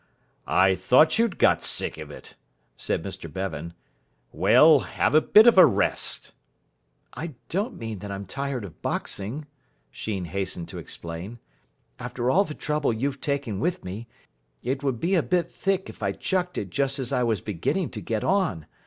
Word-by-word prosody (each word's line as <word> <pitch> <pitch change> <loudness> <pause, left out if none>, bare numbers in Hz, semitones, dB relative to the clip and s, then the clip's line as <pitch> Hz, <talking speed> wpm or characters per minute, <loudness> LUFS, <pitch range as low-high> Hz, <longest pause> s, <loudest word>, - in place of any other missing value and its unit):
"I 95 +1 +4
thought 125 - +4
you'd 230 -6 +1
got - - +3
sick - - 0
of - - -8
it," - - -11 0.4
said - - -2
Mr - - -7
Bevan. 85 -3 -5 0.6
"Well, 155 -2 +6
have - - -1
a 155 - +6
bit 215 +6 +7
of 240 - +7
a - - +11
rest." - - -1 0.8
"I 160 -4 -6
don't 200 +7 -2
mean 110 -3 -5
that 105 - -7
I'm 100 0 -5
tired 135 +2 -4
of 90 - -13
boxing," 115 +10 -3 0.5
Sheen 100 -5 -4
hastened 90 -1 -4
to - - -7
explain. 85 +7 -6 0.6
"After 125 0 -2
all 200 +7 +4
the 150 - -7
trouble 150 -3 0
you've 135 +5 -2
taken 140 -9 -2
with 175 +2 -1
me, 100 +6 -6 0.6
it 130 +3 -2
would 135 -5 -1
be 175 +8 0
a 175 - +4
bit 175 +2 0
thick 195 -1 -1
if - - -12
I - - 0
chucked 180 -1 -2
it - - -4
just 140 0 0
as 130 -3 -3
I 125 - +2
was 115 -4 +1
beginning 105 - -2
to 105 - -6
get 110 +3 -2
on. 180 - +1
125 Hz, 175 wpm, -25 LUFS, 100-155 Hz, 0.8 s, a